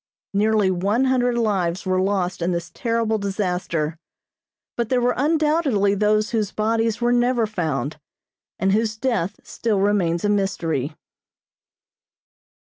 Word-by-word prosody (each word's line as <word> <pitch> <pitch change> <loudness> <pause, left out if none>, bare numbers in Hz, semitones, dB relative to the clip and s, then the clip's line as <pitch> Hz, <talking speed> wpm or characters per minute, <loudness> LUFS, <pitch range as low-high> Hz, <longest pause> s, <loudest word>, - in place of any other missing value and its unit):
Nearly 210 -1 +2
one 200 +8 +1
hundred 245 -2 +2
lives 190 -6 0
were 185 0 +1
lost 190 -2 -1
in 170 +2 0
this 170 -1 -4
terrible 230 -2 0
disaster, 180 -5 -2 0.8
but 235 -2 -2
there 255 - +2
were 245 0 +2
undoubtedly 295 -8 +2
those 210 +1 +1
whose 215 -3 0
bodies 225 +1 0
were 240 0 +3
never 240 -1 +2
found, 160 -7 -3 0.6
and 190 0 +1
whose 220 +1 +1
death 225 -7 -1
still 220 -4 -1
remains 190 -3 +1
a - - +2
mystery. 165 -8 -1
205 Hz, 125 wpm, -22 LUFS, 185-230 Hz, 0.8 s, were